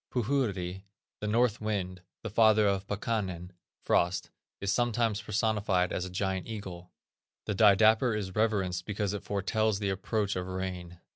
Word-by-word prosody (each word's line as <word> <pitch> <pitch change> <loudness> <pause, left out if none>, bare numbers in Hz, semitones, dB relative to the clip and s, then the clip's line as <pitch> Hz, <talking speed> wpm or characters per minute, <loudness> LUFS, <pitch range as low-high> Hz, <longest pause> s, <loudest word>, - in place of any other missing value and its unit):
Puhuri, 105 -8 -1 0.4
the 105 - -3
north 115 0 +2
wind, 95 -4 -3 0.2
the 115 - -3
father 110 -1 +5
of 100 0 0
Pakkanen 95 -4 -3 0.3
(frost) 85 +1 +1 0.3
is 100 0 0
sometimes 115 -3 +1
personified 105 -3 0
as 90 - -2
a - - -6
gigantic 95 +2 -2
eagle. 90 -5 -7 0.5
The 105 - -1
didapper 110 +3 +5
is 95 -3 -4
reverenced 95 -5 0
because 105 -1 -1
it 105 - -4
foretells 105 +1 0
the 100 -1 -1
approach 100 +1 -1
of 90 0 -3
rain. 90 -2 -5
100 Hz, 145 wpm, -30 LUFS, 95-110 Hz, 0.5 s, father